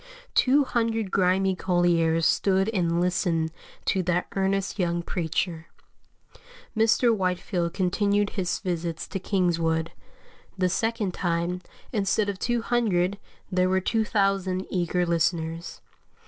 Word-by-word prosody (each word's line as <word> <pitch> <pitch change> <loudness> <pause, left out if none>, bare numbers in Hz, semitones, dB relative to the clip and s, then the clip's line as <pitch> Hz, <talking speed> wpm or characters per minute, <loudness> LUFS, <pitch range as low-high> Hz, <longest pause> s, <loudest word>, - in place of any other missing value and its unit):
Two 280 +3 +4
hundred 225 -5 -1
grimy 190 0 +2
colliers 170 -3 +2
stood 190 +1 +2
and 170 -5 0
listened 175 -2 0 0.3
to 190 - +1
that 180 0 0
earnest 195 +1 0
young 170 -1 0
preacher. 165 -1 -2 1.1
Mr. 225 +1 +3
Whitefield 180 -2 -1
continued 200 +2 +1
his 180 -3 -1
visits 170 -4 -3
to 195 - -4
Kingswood; 170 -4 0 0.7
the 185 -1 +2
second 225 -1 -1
time, 175 +1 -1 0.3
instead 205 0 +1
of 195 -2 -4
two 240 -1 0
hundred 205 -6 +1 0.3
there 185 0 +2
were 190 0 +3
2,000 195 -3 0
eager 180 -1 0
listeners. 165 0 -1
185 Hz, 115 wpm, -26 LUFS, 175-200 Hz, 1.1 s, Two